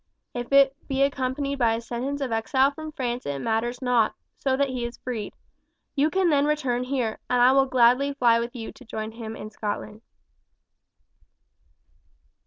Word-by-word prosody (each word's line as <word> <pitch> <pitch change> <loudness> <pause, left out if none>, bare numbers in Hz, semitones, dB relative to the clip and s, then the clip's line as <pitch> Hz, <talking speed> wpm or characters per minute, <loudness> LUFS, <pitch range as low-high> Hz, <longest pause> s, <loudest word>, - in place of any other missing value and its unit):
If 245 +1 -5
it 275 -1 +6
be 270 -1 +1
accompanied 275 +1 -1
by 230 -2 +3
a - - -3
sentence 250 +5 -4
of 265 -3 -2
exile 260 +5 +2
from 310 +2 -8
France 250 -3 -3
it 140 -1 -2
matters 230 - -1
not, 245 -3 +2 0.2
so 265 -1 +1
that 280 0 +1
he 250 -2 -3
is 235 0 -5
freed. 240 -4 -5 0.6
You 290 +2 +3
can 375 -1 +2
then 285 -1 +3
return 265 -5 0
here, 250 -4 -2
and 250 0 +2
I 245 +1 +7
will 270 0 +4
gladly 260 +3 +3
fly 235 -4 +4
with 235 +2 -4
you 225 -2 -6
to 270 - -15
join 220 -2 -5
him 225 -1 -7
in 215 0 -8
Scotland." 210 0 -5
250 Hz, 175 wpm, -25 LUFS, 230-275 Hz, 0.6 s, I